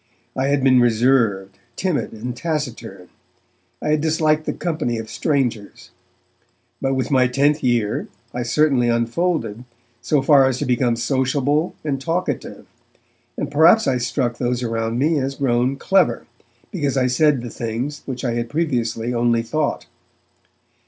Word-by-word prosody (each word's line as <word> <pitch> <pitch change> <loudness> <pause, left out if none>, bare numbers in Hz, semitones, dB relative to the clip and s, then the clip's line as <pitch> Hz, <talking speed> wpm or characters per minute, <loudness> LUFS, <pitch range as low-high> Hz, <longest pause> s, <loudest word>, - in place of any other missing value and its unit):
I 130 +1 0
had 140 -1 +1
been 130 -2 +5
reserved, 115 -5 +1 0.2
timid 180 -2 -1
and 120 +3 -6
taciturn; 120 - -5 0.7
I - - -1
had 150 0 +2
disliked 155 -1 +1
the - - +1
company 155 -9 -2
of 110 -1 -7
strangers. 125 -8 -2 0.9
But 135 0 0
with 130 +2 -2
my 130 -2 +4
tenth 140 +4 +1
year, 120 -4 0 0.3
I 125 - -3
certainly 125 -1 +2
unfolded, 115 -1 -1 0.4
so 145 -3 +1
far 135 -2 +5
as 130 -1 -1
to - - -2
become 125 -1 +1
sociable 135 +5 0
and 135 -3 -2
talkative, 165 -3 -3 0.7
and - - -3
perhaps 165 +9 +5
I 130 -2 +1
struck 120 -1 -2
those 125 0 -1
around 115 0 -2
me 150 +4 +2
as 135 +1 -3
grown 130 -1 +1
'clever', 180 -9 +2 0.5
because 145 -7 -1
I 130 - +2
said 135 +1 +2
the 120 - -6
things 120 +6 -4
which 130 -1 -4
I 120 - 0
had 120 0 -3
previously 120 -7 -1
only 120 -1 +1
thought. 145 +6 -2
130 Hz, 145 wpm, -21 LUFS, 120-150 Hz, 0.9 s, been